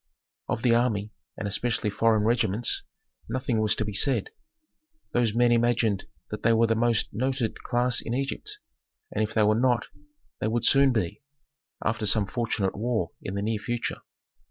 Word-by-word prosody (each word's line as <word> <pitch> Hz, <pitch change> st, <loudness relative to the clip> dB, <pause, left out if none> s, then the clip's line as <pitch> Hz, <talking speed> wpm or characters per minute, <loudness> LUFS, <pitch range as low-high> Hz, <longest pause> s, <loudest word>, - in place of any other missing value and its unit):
Of 110 Hz, -, -2 dB
the 120 Hz, -2 st, +4 dB
army, 110 Hz, -3 st, +1 dB, 0.3 s
and 105 Hz, -, -3 dB
especially 105 Hz, 0 st, 0 dB
foreign 110 Hz, 0 st, +2 dB
regiments, 115 Hz, -1 st, +1 dB, 0.5 s
nothing 125 Hz, -2 st, 0 dB
was 110 Hz, 0 st, +3 dB
to 110 Hz, -, -1 dB
be 105 Hz, -, -4 dB
said. 135 Hz, -, +1 dB, 0.8 s
Those 115 Hz, -3 st, +1 dB
men 120 Hz, 0 st, +4 dB
imagined 115 Hz, -3 st, +2 dB, 0.2 s
that -, -, -5 dB
they 115 Hz, -, +4 dB
were 115 Hz, +1 st, +4 dB
the 115 Hz, -, +2 dB
most 115 Hz, 0 st, +1 dB
noted 130 Hz, +1 st, -1 dB
class 125 Hz, 0 st, +1 dB
in 115 Hz, -, -3 dB
Egypt, 135 Hz, +1 st, -3 dB, 0.5 s
and 110 Hz, -, 0 dB
if 110 Hz, +1 st, -4 dB
they 110 Hz, -, +4 dB
were 105 Hz, +1 st, +4 dB
not, 120 Hz, -3 st, +2 dB, 0.5 s
they -, -, -1 dB
would 115 Hz, +2 st, 0 dB
soon 135 Hz, -1 st, +6 dB
be, 105 Hz, -4 st, -2 dB, 0.6 s
after 110 Hz, -1 st, 0 dB
some 105 Hz, 0 st, +4 dB
fortunate 110 Hz, -3 st, -1 dB
war 110 Hz, -5 st, -1 dB
in 95 Hz, -, -5 dB
the 100 Hz, -, -2 dB
near 110 Hz, 0 st, -1 dB
future. 120 Hz, +1 st, -3 dB
115 Hz, 170 wpm, -27 LUFS, 105-120 Hz, 0.8 s, soon